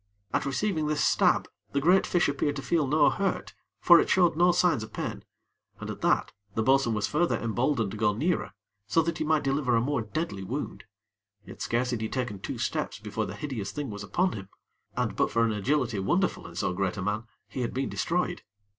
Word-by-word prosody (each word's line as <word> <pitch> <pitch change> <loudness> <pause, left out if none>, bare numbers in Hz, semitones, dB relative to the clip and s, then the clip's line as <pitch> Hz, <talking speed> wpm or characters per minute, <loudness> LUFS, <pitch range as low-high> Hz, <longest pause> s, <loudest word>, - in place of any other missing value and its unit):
At - - 0
receiving 155 +2 0
this 150 -1 +1
stab, - - +3 0.3
the 140 - +2
great 180 +7 +4
fish 175 - +2
appeared 145 +1 0
to 135 - -5
feel 160 -5 +1
no 150 +2 +4
hurt 195 -1 -2 0.3
for 175 -1 +7
it - - +1
showed 175 -4 +4
no 175 +2 +5
signs 175 -7 +2
of 110 - -7
pain, - - -4 0.6
and, - - -5
at - - -9
that, - - +2 0.2
the 110 - +1
bo'sun 130 -2 +3
was 105 -1 0
further 170 +7 +1
emboldened 115 -1 0
to 110 - -6
go 105 -1 +3
nearer, 120 - -1 0.3
so 165 +8 +3
that 165 +1 -2
he - - 0
might 155 -1 +2
deliver 135 -3 +1
a - - +4
more 140 0 0
deadly 110 - -4
wound; 130 +6 -5 0.6
yet - - -11
scarce 125 +2 0
had 120 -3 -2
he 110 - -2
taken 125 -6 -3
two - - -5
steps - - -2
before - - -3
the - - -6
hideous 120 -10 -4
thing 140 +1 -4
was 105 0 -6
upon 180 - +1
him, 95 -2 -8 0.5
and, - - -1
but - - +2
for 115 0 +2
an 115 - +1
agility 115 +1 0
wonderful 175 - 0
in 85 - -12
so 90 - -1
great 95 +1 -1
a 95 - -3
man, 105 +3 -2 0.2
he 130 - -5
had 120 - -1
been 135 +1 -2
destroyed. 180 +1 -1
135 Hz, 215 wpm, -28 LUFS, 110-155 Hz, 0.6 s, for